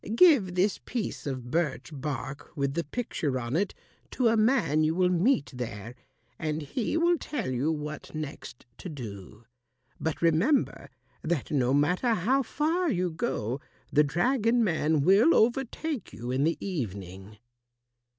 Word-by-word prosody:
Give 235 Hz, -, +5 dB
this 190 Hz, +3 st, +2 dB
piece 230 Hz, -10 st, -4 dB
of 130 Hz, -3 st, -5 dB
birch 165 Hz, -2 st, -1 dB
bark 135 Hz, -1 st, -5 dB
with 140 Hz, -1 st, 0 dB
the 170 Hz, +2 st, -1 dB
picture 150 Hz, -, -2 dB
on 120 Hz, +3 st, -3 dB
it 195 Hz, +3 st, 0 dB, 0.3 s
to 245 Hz, -3 st, +2 dB
a 225 Hz, -, +3 dB
man 215 Hz, -, +3 dB
you 155 Hz, +1 st, +1 dB
will 180 Hz, 0 st, +3 dB
meet 175 Hz, -, +2 dB
there, 115 Hz, -2 st, -6 dB, 0.5 s
and 155 Hz, 0 st, -2 dB
he 230 Hz, -, -2 dB
will 340 Hz, 0 st, +3 dB
tell 285 Hz, -, -3 dB
you 130 Hz, +5 st, 0 dB
what 150 Hz, 0 st, -6 dB
next 150 Hz, -5 st, -7 dB
to 185 Hz, -, -6 dB
do. 110 Hz, -, -9 dB, 0.5 s
But 160 Hz, -1 st, -2 dB
remember 170 Hz, -, +2 dB, 0.3 s
that 160 Hz, -3 st, -2 dB
no 130 Hz, -4 st, +2 dB
matter 180 Hz, -, +2 dB
how 255 Hz, +10 st, +2 dB
far 315 Hz, +8 st, 0 dB
you 180 Hz, -7 st, 0 dB
go, 135 Hz, -, -2 dB, 0.3 s
the 150 Hz, -, +6 dB
dragon 230 Hz, -, +2 dB
man 160 Hz, -5 st, +1 dB
will 200 Hz, -, +5 dB
overtake 270 Hz, +4 st, 0 dB
you 120 Hz, +2 st, -6 dB
in 135 Hz, +3 st, +1 dB
the 165 Hz, -, +1 dB
evening." 100 Hz, -, -5 dB
160 Hz, 150 wpm, -28 LUFS, 135-225 Hz, 0.5 s, the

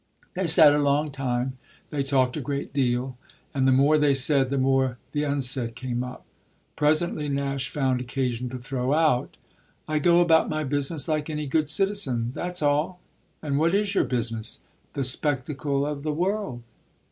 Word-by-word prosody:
They 185 Hz, -1 st, -1 dB
sat 160 Hz, -3 st, +6 dB
a 150 Hz, -, +2 dB
long 145 Hz, +1 st, +1 dB
time; 130 Hz, -1 st, -2 dB, 0.3 s
they 145 Hz, -, -1 dB
talked 135 Hz, -2 st, +1 dB
a 155 Hz, -, -3 dB
great 140 Hz, +2 st, -4 dB
deal, 125 Hz, -1 st, -1 dB, 0.3 s
and 135 Hz, -1 st, +1 dB
the -, -, +5 dB
more 140 Hz, +4 st, +4 dB
they 145 Hz, -2 st, +3 dB
said 135 Hz, 0 st, +2 dB
the 140 Hz, -, -1 dB
more 130 Hz, -1 st, +1 dB
the 145 Hz, -, -1 dB
unsaid 130 Hz, -5 st, -1 dB
came 125 Hz, 0 st, -3 dB
up. 125 Hz, 0 st, -9 dB, 0.5 s
Presently 150 Hz, 0 st, +1 dB
Nash 140 Hz, -2 st, -2 dB
found 130 Hz, -3 st, 0 dB
occasion 125 Hz, -1 st, -2 dB
to 130 Hz, -, -6 dB
throw 125 Hz, +2 st, -2 dB
out: 155 Hz, -6 st, +1 dB, 0.5 s
"I 155 Hz, 0 st, 0 dB
go 170 Hz, +3 st, +4 dB
about 165 Hz, -2 st, +4 dB
my 155 Hz, 0 st, -1 dB
business 145 Hz, +1 st, -1 dB
like 155 Hz, -1 st, -1 dB
any 150 Hz, -1 st, -3 dB
good 150 Hz, +2 st, 0 dB
citizen 150 Hz, -, +1 dB
that's 180 Hz, 0 st, -4 dB
all." 150 Hz, +5 st, +1 dB, 0.4 s
"And 145 Hz, -2 st, 0 dB
what 165 Hz, +4 st, +2 dB
is 205 Hz, 0 st, +1 dB
your -, -, +3 dB
business?" 115 Hz, -3 st, -3 dB, 0.3 s
"The 140 Hz, -, -1 dB
spectacle 140 Hz, +1 st, 0 dB
of 145 Hz, -1 st, -4 dB
the 150 Hz, +1 st, -2 dB
world." 180 Hz, -, -2 dB
140 Hz, 170 wpm, -25 LUFS, 130-155 Hz, 0.5 s, sat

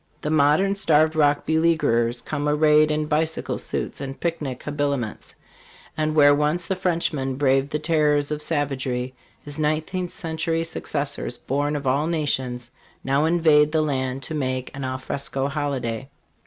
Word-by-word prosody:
The 150 Hz, -, -2 dB
modern 155 Hz, +6 st, +3 dB
Starved 160 Hz, -5 st, +3 dB
Rock 145 Hz, -2 st, +2 dB
beleaguererscome 150 Hz, -3 st, +1 dB
arrayed 150 Hz, 0 st, +4 dB
in 155 Hz, 0 st, 0 dB
bicycle 155 Hz, +1 st, -1 dB
suits -, -, -4 dB
and 135 Hz, -1 st, -6 dB
picnic 150 Hz, -7 st, -3 dB
habiliments; 140 Hz, -6 st, -3 dB, 0.6 s
and 155 Hz, 0 st, -1 dB
where 145 Hz, -1 st, +7 dB
once 150 Hz, +4 st, 0 dB
the 190 Hz, -, -1 dB
Frenchman 165 Hz, -7 st, -1 dB
braved 135 Hz, 0 st, +2 dB
the 150 Hz, -, -1 dB
terrors 150 Hz, -2 st, +1 dB
of 150 Hz, 0 st, -2 dB
savagery, 130 Hz, -5 st, -1 dB, 0.3 s
his 145 Hz, +1 st, -5 dB
nineteenth 155 Hz, +4 st, -1 dB
century 165 Hz, 0 st, -2 dB
successors, 145 Hz, -6 st, -3 dB
born 145 Hz, +2 st, -1 dB
of 145 Hz, -1 st, -4 dB
all 140 Hz, +4 st, +1 dB
nations, 130 Hz, -7 st, -2 dB, 0.3 s
now 140 Hz, +3 st, +2 dB
invade 155 Hz, -3 st, +4 dB
the 155 Hz, -1 st, +2 dB
land 130 Hz, -2 st, -2 dB
to 125 Hz, -, -6 dB
make 130 Hz, -4 st, -3 dB
an 140 Hz, -, -5 dB
al 130 Hz, 0 st, -2 dB
fresco 135 Hz, +1 st, -3 dB
holiday. 135 Hz, -4 st, -3 dB
150 Hz, 145 wpm, -23 LUFS, 135-155 Hz, 0.6 s, where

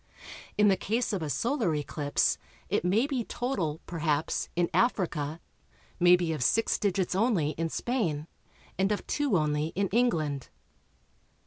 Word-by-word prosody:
In 210 Hz, -, +5 dB
the 195 Hz, -, +5 dB
case 225 Hz, +4 st, -1 dB
of 195 Hz, -, -1 dB
a 155 Hz, -, -3 dB
Solar 230 Hz, -, 0 dB
eclipse 145 Hz, 0 st, 0 dB, 0.3 s
it -, -, +1 dB
may 200 Hz, +8 st, +3 dB
be 270 Hz, -4 st, -1 dB
total, 185 Hz, -, -2 dB
perhaps, 155 Hz, -3 st, -1 dB
in 175 Hz, 0 st, +2 dB
Africa, 165 Hz, -, 0 dB, 0.6 s
may 175 Hz, 0 st, +7 dB
be 175 Hz, -2 st, -1 dB
of 150 Hz, -, -2 dB
six 225 Hz, -, +2 dB
digits 190 Hz, -3 st, 0 dB
only 190 Hz, -7 st, +2 dB
in 165 Hz, +1 st, -2 dB
Spain, 170 Hz, -, -1 dB, 0.5 s
and 195 Hz, +2 st, +2 dB
of 210 Hz, -, -2 dB
two 285 Hz, -9 st, +1 dB
only 150 Hz, -1 st, 0 dB
in 195 Hz, 0 st, 0 dB
England. 160 Hz, -, 0 dB
180 Hz, 145 wpm, -29 LUFS, 155-225 Hz, 0.6 s, may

